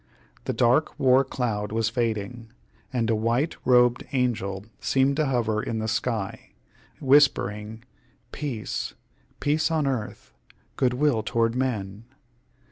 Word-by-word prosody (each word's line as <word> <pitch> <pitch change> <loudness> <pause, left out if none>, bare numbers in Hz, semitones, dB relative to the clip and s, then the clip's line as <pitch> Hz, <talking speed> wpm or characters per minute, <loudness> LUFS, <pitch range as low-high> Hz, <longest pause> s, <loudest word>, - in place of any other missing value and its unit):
The - - 0
dark 125 +6 +2
war 130 0 +5
cloud 105 -6 -3
was 115 0 +1
fading, 115 -1 -2 0.4
and 120 -3 0
a - - +3
white 115 +8 0
robed 125 -1 +4
angel 105 -7 -1
seemed 135 +1 +2
to 155 -2 +2
hover 115 -5 0
in 115 - -3
the 110 0 -2
sky, 110 -2 -3 0.5
whispering 110 -6 +2 0.5
"Peace 135 -8 -4 0.4
peace 155 +2 +1
on 160 -3 +1
earth, 125 -6 -4 0.4
good 125 -2 +1
will 135 -4 +2
toward 115 +1 0
men!" 110 -5 -3
120 Hz, 125 wpm, -25 LUFS, 110-130 Hz, 0.5 s, war